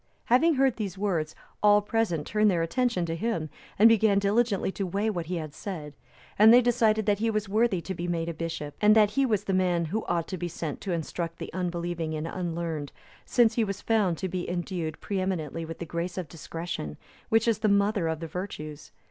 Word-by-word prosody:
Having 310 +7 +4
heard 265 -2 +2
these 200 -4 -4
words, 175 -6 -1 0.3
all 210 0 +6
present 205 -7 -1
turned 210 0 +3
their 170 -4 +1
attention 235 0 0
to 165 0 -3
him 170 -5 -2 0.3
and 215 - +8
began 220 -3 +4
diligently 200 0 +1
to 195 - -4
weigh 200 +4 0
what 175 -5 -4
he 180 - -2
had 155 -3 -5
said, 155 -7 -6 0.5
and 215 +1 +9
they 245 - +9
decided 225 -3 +2
that 205 -1 +2
he 225 +1 +1
was 215 -1 -1
worthy 210 -2 +2
to 190 - -5
be 175 0 -4
made 165 -1 -1
a 170 - -2
bishop, 160 -2 -5
and 210 0 +6
that 210 -2 +5
he 270 +5 +2
was 210 -4 +1
the 195 - -2
man 180 -2 +2
who 215 +8 -2
ought 170 -1 -1
to 185 - -4
be 175 - -2
sent 160 -3 -5
to 195 - -3
instruct 165 0 -3
the - - -7
unbelieving 175 -3 -2
and 155 +1 -3
unlearned; 165 -4 -3 0.3
since 235 -2 +3
he 230 - +2
was 200 -2 -3
found 205 -7 +1
to 190 - -3
be 180 -1 -4
endued 175 -3 -3
preeminently 185 -5 -2
with 165 0 -7
the 170 - -5
grace 170 +2 -4
of 180 -3 -3
discretion, 165 - -6 0.3
which 225 +1 +3
is 225 -2 +2
the 215 - +2
mother 200 -2 +2
of 160 0 -2
the 165 - -4
virtues. 155 -4 -7
185 Hz, 215 wpm, -27 LUFS, 165-215 Hz, 0.5 s, and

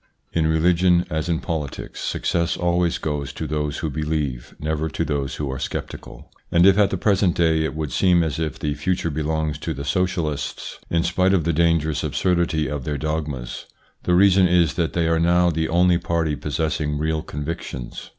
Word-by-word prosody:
In 80 -1 +2
religion, 85 +2 +3
as 80 +2 -2
in 85 -1 0
politics, 75 -5 -5
success 85 0 -1
always 85 0 +1
goes 75 -3 -3
to 80 - -5
those 75 -1 -2
who 80 - -2
believe, 75 -4 -3
never 80 +1 -2
to - - -2
those 70 -2 -2
who 70 -3 -3
are 65 - -5
sceptical, - - -6 0.2
and 85 +1 +5
if 95 -1 +7
at 100 -2 +5
the - - -2
present 95 -4 +2
day 80 -2 +2
it 80 - -3
would 80 -3 -3
seem 90 +5 +3
as 80 -2 -2
if 80 -3 -2
the 75 - -2
future 85 +3 -1
belongs 80 0 -2
to - - -4
the 70 - -6
Socialists, 85 -4 -2
in 85 0 +1
spite 95 +2 +2
of 85 - +1
the 85 +1 0
dangerous 80 -2 +1
absurdity 80 0 +1
of 75 -3 -4
their 75 +2 -2
dogmas, 75 -5 -4 0.3
the 90 - +1
reason 95 0 +5
is 85 -3 +3
that 85 -3 -1
they 85 -1 +1
are 80 0 +2
now 85 +1 +3
the 80 0 -1
only 90 +1 +3
party 85 -3 0
possessing 75 0 -2
real 80 +1 -1
convictions. 75 -5 -6
80 Hz, 190 wpm, -22 LUFS, 75-85 Hz, 0.3 s, if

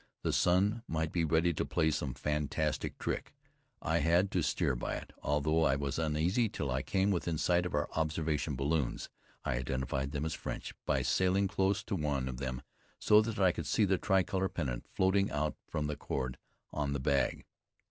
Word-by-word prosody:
The - - 0
sun 100 +6 +3
might 80 0 -1
be 85 - +1
ready 80 +2 +3
to - - -1
play 80 0 +1
some 75 -3 -2
fantastic 75 0 -1
trick. - - -3 0.5
I 80 +1 +2
had 85 +4 +3
to 90 - +1
steer 75 -2 +1
by - - -3
it, - - -8
although 75 +3 +2
I 70 - +3
was 70 +2 -2
uneasy 80 +8 +2
until 70 -10 -3
I 65 +1 0
came 95 +6 +1
within 85 -3 -1
sight 90 +2 +2
of 85 - -4
our 75 - +1
observation 80 -2 0
balloons. 70 0 -1 0.4
I - - 0
identified 65 +2 -2
them 75 +1 -2
as 80 - -1
French - - -5
by 70 -4 +2
sailing 95 +9 +2
close 95 +2 +1
to 105 - -2
one 70 -6 -1
of 65 -1 -4
them 65 -1 -4 0.3
so 105 0 +6
that 110 0 -3
I 95 -2 +5
could - - -5
see 110 - +3
the 95 -1 +1
tricolor 95 -1 +1
pennant 65 -7 -3
floating 95 +1 +2
out 75 +1 -1
from 75 -1 -1
a 75 - -2
cord 65 -3 -3 0.3
on 70 -2 -1
the 70 - -1
bag. 70 +1 +1
80 Hz, 190 wpm, -32 LUFS, 70-90 Hz, 0.5 s, so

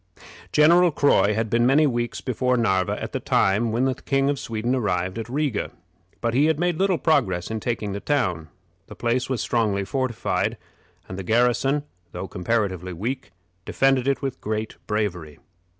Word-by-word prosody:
General 170 +4 +5
Croy 140 -8 +3
had 110 +1 0
been 115 +2 +2
many 140 +5 +4
weeks 120 -3 -1
before 125 0 0
Narva 95 -5 +1
at - - -5
the - - -2
time 105 +4 +2
when 120 +4 +1
the 135 - +1
King 135 +2 0
of 140 - -3
Sweden 115 +2 -2
arrived 95 -5 -1
at 115 +1 -6
Riga, 140 -5 -1 0.5
but 115 -1 0
he 140 +4 +4
had 155 -1 +1
made 175 -2 0
little 190 -2 +2
progress 110 - +1
in 110 - -2
taking 110 -2 -3
the 100 - -3
town. 90 - -1 0.4
The - - -10
place 120 +2 -1
was 130 -3 -1
strongly 105 -4 0
fortified, 110 -4 -1 0.5
and 95 - -7
the - - -4
garrison, 125 +7 +2 0.3
though - - -5
comparatively 95 -2 -2
weak, 120 +8 -4 0.3
defended 135 +4 +2
it 140 0 0
with 135 -1 -4
great 110 0 -3
bravery. 90 -8 -2
120 Hz, 170 wpm, -24 LUFS, 100-135 Hz, 0.5 s, General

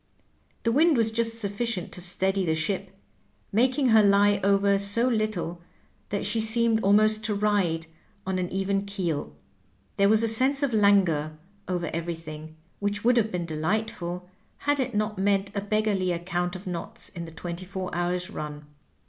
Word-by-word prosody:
The 230 - +2
wind 305 +3 +4
was 225 -1 +2
just 230 0 -1
sufficient 205 -2 -2
to 180 - -6
steady 190 +2 0
the 160 -3 +1
ship, 190 +4 -2 0.6
making 255 +5 +2
her 220 -1 +7
lie 200 0 +4
over 200 0 +3
so 205 +5 0
little 215 -7 -1 0.5
that 200 - -2
she 210 +3 +1
seemed 225 0 +3
almost 215 +2 +4
to 215 -2 0
ride 200 -6 +1 0.4
on 190 -1 -1
an 180 -1 -3
even 195 +1 -1
keel* 175 -7 -3 0.6
There 200 0 +4
was 220 +1 +5
a - - +3
sense 265 +6 +3
of 270 -4 0
languor 185 -8 +3 0.3
over 180 -2 -2
everything, 160 -2 -6 0.2
which 205 0 -2
would 245 +1 +4
have 220 -1 +2
been 175 -1 -2
delight 185 +8 -1
ful 180 -3 -6 0.3
had 290 0 0
it 255 -3 -1
not 210 -1 -1
meant 200 0 +1
a 200 - -2
beggarly 205 -3 0
account 175 +1 -2
of 185 +3 -9
knots 180 -2 -6
in 170 -4 -7
the 165 - -10
twenty 175 +2 -7
four 190 -1 -5
hours' 180 +2 -1
run. 150 -3 -6
200 Hz, 170 wpm, -26 LUFS, 175-220 Hz, 0.6 s, her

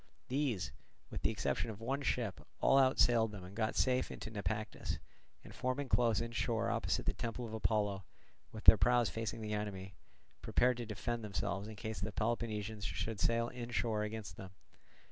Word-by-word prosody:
These, 130 -7 0 0.4
with - - -4
the - - +2
exception 110 +2 -1
of 110 -2 -7
one 135 +5 -1
ship, 115 -7 -1 0.2
all 135 - +5
outsailed 120 -4 +5
them 105 -3 -8
and 90 +2 -10
got 110 0 0
safe 130 -1 +2
into 110 - -7
Naupactus, 105 +1 -2 0.5
and - - -11
forming 130 +2 -2
close 115 -3 +3
inshore 115 0 0
opposite - - 0
the - - +1
temple 120 +1 -3
of 110 - -7
Apollo, 105 -3 +1 0.5
with 110 0 -8
their 110 - +9
prows 120 -1 +4
facing 115 0 -3
the 105 -1 -3
enemy, 100 -2 -4 0.5
prepared 125 0 +3
to 120 -2 -4
defend 115 +2 -3
themselves 100 0 -2
in 110 - -7
case 110 +1 -5
the 110 - -2
Peloponnesians 110 -2 -2
should 100 +3 -2
sail 115 +2 +2
inshore 120 -3 -1
against 105 0 -4
them. 95 - -8
110 Hz, 170 wpm, -36 LUFS, 105-120 Hz, 0.5 s, their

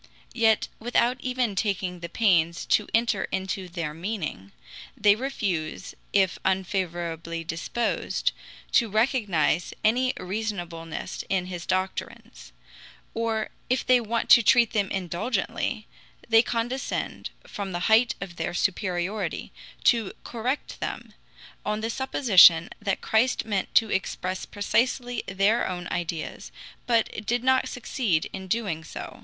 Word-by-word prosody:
Yet, 225 -2 +3
without 245 +2 +1
even 250 -4 0
taking 185 -3 -1
the 170 0 -6
pains 170 -6 +2
to 210 - +2
enter 230 -4 +2
into 190 -1 -3
their 170 -4 -4
meaning, 165 - -5 0.5
they 205 -1 +6
refuse, 205 - -3 0.2
if 190 -2 +2
unfavorably 175 -3 -2
disposed, 170 +8 -1 0.4
to 230 -3 +3
recognize 205 - +1
any 250 +4 +3
reasonableness 180 -5 -4
in 185 -2 +1
his 180 -2 -6
doctrines; 185 - -3 0.6
or 225 -1 -1 0.2
if 255 0 +1
they 250 -1 +5
want 230 +1 -1
to 235 - +10
treat 235 +1 +4
them 200 -3 +1
indulgently, 195 +3 -2 0.4
they 225 -1 +6
condescend, 240 +2 -3 0.2
from 200 -2 -5
the 175 -1 -3
height 225 +5 +4
of 185 -3 -7
their 175 - -3
superiority, 190 +1 -1 0.3
to 230 -5 +3
correct 245 +4 -3
them, - - -5 0.5
on 210 +1 -2
the 225 +1 -1
supposition 200 - +6
that 200 -2 -1
Christ 235 +3 +2
meant 205 -4 -2
to 225 -2 +5
express 185 -1 -2
precisely 245 +4 0
their 195 +5 +2
own 175 -1 -4
ideas, 170 -2 -4 0.4
but 230 -3 +1
did 240 +3 0
not 260 0 +3
succeed 230 - -1
in 190 0 -6
doing 185 -6 -1
so. - - -8
205 Hz, 125 wpm, -26 LUFS, 175-230 Hz, 0.6 s, to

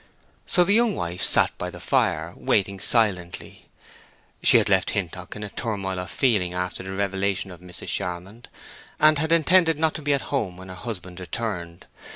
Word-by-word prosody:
So 180 - +4
the 200 - +2
young 230 -1 +3
wife 85 +1 -4
sat - - +3
by - - -3
the - - -10
fire, - - 0
waiting 100 -1 0
silently. 95 -5 -1 0.7
She - - +7
had - - +2
left 95 -1 +3
Hintock 90 -3 -4
in 105 - -6
a 105 - -5
turmoil 95 -5 -3
of 90 +1 -5
feeling 100 -9 +1
after 90 0 -3
the 95 +1 -7
revelation 100 0 -1
of 90 - -11
Mrs. 90 0 -9
Charmond, 90 +7 -3 0.5
and 155 -1 +5
had 160 +1 0
intended 165 0 +4
not 160 0 +1
to - - -6
be 145 0 +1
at 140 - -2
home 100 -10 -1
when 95 0 -11
her - - -7
husband 95 -3 -6
returned. 90 -2 -5
100 Hz, 185 wpm, -24 LUFS, 90-125 Hz, 0.7 s, She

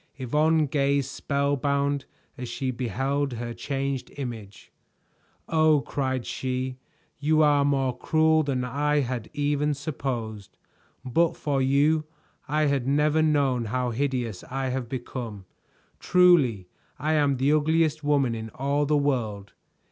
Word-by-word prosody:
Yvonne 150 +4 +2
gazed 140 -1 0
spell 140 +1 0
bound 140 +1 0 0.3
as 125 -1 -6
she 130 +2 -2
beheld 135 +3 -1
her 120 0 -5
changed 135 +2 -3
image. 115 -8 -7 0.8
"Oh!" 155 -2 +4
cried 130 -3 -2
she, 130 0 -3 0.4
"you 155 +2 +3
are 145 -1 +4
more 135 -3 +1
cruel 155 +4 +3
than 135 -4 -1
I 145 +4 +1
had 125 -4 -4
even 145 0 0
supposed. 125 -8 -5 0.5
But 165 +7 +1
for 140 -2 -1
you 145 +4 +2 0.4
I 155 +2 +1
had 140 -3 0
never 150 +2 +2
known 140 -6 +2
how 125 +2 -1
hideous 120 -6 -2
I 135 0 -3
have 125 -2 -3
become. 120 -5 -6 0.5
Truly 155 - +4 0.3
I 155 +4 0
am 145 -3 +2
the 135 +3 +2
ugliest 155 0 +2
woman 140 -4 +2
in 110 0 -5
all 140 +2 0
the 150 0 +3
world!" 115 -9 -1
140 Hz, 135 wpm, -26 LUFS, 125-150 Hz, 0.8 s, Oh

